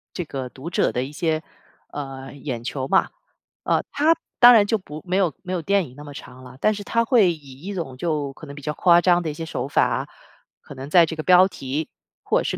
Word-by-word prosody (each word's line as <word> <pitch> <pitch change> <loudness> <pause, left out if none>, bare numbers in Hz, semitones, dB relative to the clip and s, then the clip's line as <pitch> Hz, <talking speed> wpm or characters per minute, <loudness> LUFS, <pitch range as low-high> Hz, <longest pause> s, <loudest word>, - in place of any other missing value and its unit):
这 175 - -3
个 135 -4 -5
读 135 +7 -8
者 - - +1
的 125 - -1
一 135 - -7
些， 160 0 -1 0.5
呃， 135 -2 -7
眼 130 -4 -6
球 130 +1 -4
嘛， - - +3 0.5
呃， - - +1
它 305 +4 +3 0.2
当 245 0 +10
然 215 -3 +6
就 225 - +2
不 155 -6 -10
没 185 +2 +1
有 180 -5 +2
没 185 - -5
有 175 - -1
电 195 +1 +1
影 125 - -17
那 145 - -11
么 145 -1 -10
长 130 -2 -11
了， 130 +1 -13
但 215 - +3
是 205 0 -6
它 230 +3 +1
会 215 -9 +4
以 140 -3 -14
一 200 +3 -6
种 135 -8 -5
就 150 -3 -2
可 155 - -12
能 140 - -9
比 145 - -10
较 150 +2 -3
夸 175 +1 +5
张 175 -1 +3
的 160 - -2
一 150 - -4
些 165 +2 -6
手 135 -4 -4
法， - - +1 0.5
可 - - -12
能 135 +2 -8
在 170 +1 +6
这 160 - -6
个 155 - -5
标 185 +1 +6
题， 145 -2 -4 0.3
或 - - +2
者 - - -2
是 - - -2
155 Hz, 265 characters per minute, -23 LUFS, 135-180 Hz, 0.5 s, 当